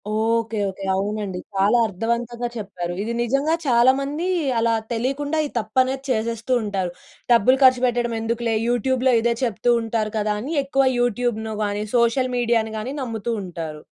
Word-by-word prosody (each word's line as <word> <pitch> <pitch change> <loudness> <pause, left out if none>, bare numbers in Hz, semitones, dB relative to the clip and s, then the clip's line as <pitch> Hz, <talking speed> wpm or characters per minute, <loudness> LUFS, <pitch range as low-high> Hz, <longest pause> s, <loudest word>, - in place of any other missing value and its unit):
Okay. 225 0 0
Okay. 190 +1 -9
అవునండి. 200 -1 -2 0.2
చాలా 200 +5 +3
అర్థవంతంగా 235 +4 -2
చెప్పారు. 180 -4 -5
ఇది 230 +2 -3
నిజంగా 275 +7 +1
చాలా 240 0 +6
మంది 295 +6 -3 0.3
అలా 230 0 +2 0.2
తెలియకుండా 275 +6 -1
ఈ - - -12
తప్పనేది 260 +4 0
చేసేస్తూ 230 +1 -1
ఉంటారు. 195 -4 -2 0.4
డబ్బులు 245 +3 +5
ఖర్చుపెట్టడం 245 -2 +3
ఎందుకులే 230 0 -1
యూట్యూబ్‌లో 255 +2 +2
ఇదే 235 +1 +2
చెప్తూ 235 0 +1
ఉంటారు 225 -1 -2
కదా! 210 0 0
అని 280 +8 -4
ఎక్కువ 275 0 +1 0.2
యూట్యూబ్‌ను 240 -2 -1
గాని, 205 0 -2
సోషల్ 240 +2 +2
మీడియా‌ని 230 -2 +1
గాని 230 +5 -4
నమ్ముతూ 230 -1 -3
ఉంటారు. 165 -4 -6
230 Hz, 140 wpm, -22 LUFS, 215-250 Hz, 0.4 s, చాలా